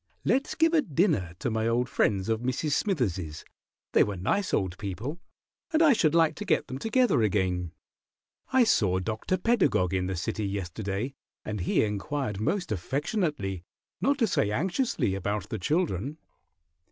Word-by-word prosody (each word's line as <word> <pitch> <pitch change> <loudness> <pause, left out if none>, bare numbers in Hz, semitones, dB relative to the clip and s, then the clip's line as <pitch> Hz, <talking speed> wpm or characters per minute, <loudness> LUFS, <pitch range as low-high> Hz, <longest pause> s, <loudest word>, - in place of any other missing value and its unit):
Let's 270 +3 +1
give 325 0 +3
a 320 - +5
dinner 150 - 0
to - - -2
my 110 0 0
old 120 +2 +1
friends 100 -6 +1
of 110 0 0
Mrs. 130 +5 -1
Smithers's; 100 - -1 0.5
they - - +5
were 100 -2 -3
nice 190 - 0
old 95 -2 0
people, 110 - -5 0.5
and 320 0 +4
I 300 -4 +7
should 160 -8 +2
like 165 -2 +4
to - - -4
get - - +1
them 130 - -5
together 240 - +2
again. 90 -4 0 0.8
I 260 -1 +5
saw 100 - +3
Dr. 110 - -1
Pedagog 185 - +2
in 90 -1 0
the 95 - -2
city 100 +4 -2
yesterday, 100 +5 -3 0.3
and 105 -1 -3
he 90 - +2
inquired 105 +1 -2
most 175 - -1
affectionately, 135 - -2 0.4
not 280 +1 +2
to 245 - +3
say 170 - +1
anxiously, 180 - 0
about 100 +1 -2
the 110 - -3
children." 150 - -1
115 Hz, 160 wpm, -28 LUFS, -, 0.8 s, I